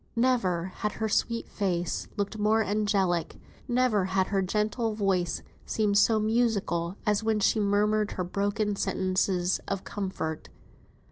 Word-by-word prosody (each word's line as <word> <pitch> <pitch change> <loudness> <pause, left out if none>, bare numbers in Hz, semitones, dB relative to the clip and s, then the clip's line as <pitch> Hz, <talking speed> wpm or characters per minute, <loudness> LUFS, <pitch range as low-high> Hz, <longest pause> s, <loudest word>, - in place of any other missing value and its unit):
Never 195 -8 +1
had 210 - -2
her 220 - -2
sweet 230 +2 0
face 175 -4 -2
looked 205 +1 -2
more 220 +1 +3
angelic, 200 -5 0 0.3
never 240 -5 +2
had 190 0 +1
her 195 -1 +1
gentle 215 +3 -1
voice 190 -5 0 0.2
seemed 205 -2 +2
so 220 +1 +4
musical 215 -6 0
as 210 0 +1
when 220 -1 +1
she 215 - +2
murmured 210 +1 +2
her 185 - -2
broken 205 +3 -1
sentences 185 -1 0
of 195 -1 -2
comfort. 185 -6 -4
205 Hz, 135 wpm, -28 LUFS, 185-215 Hz, 0.3 s, so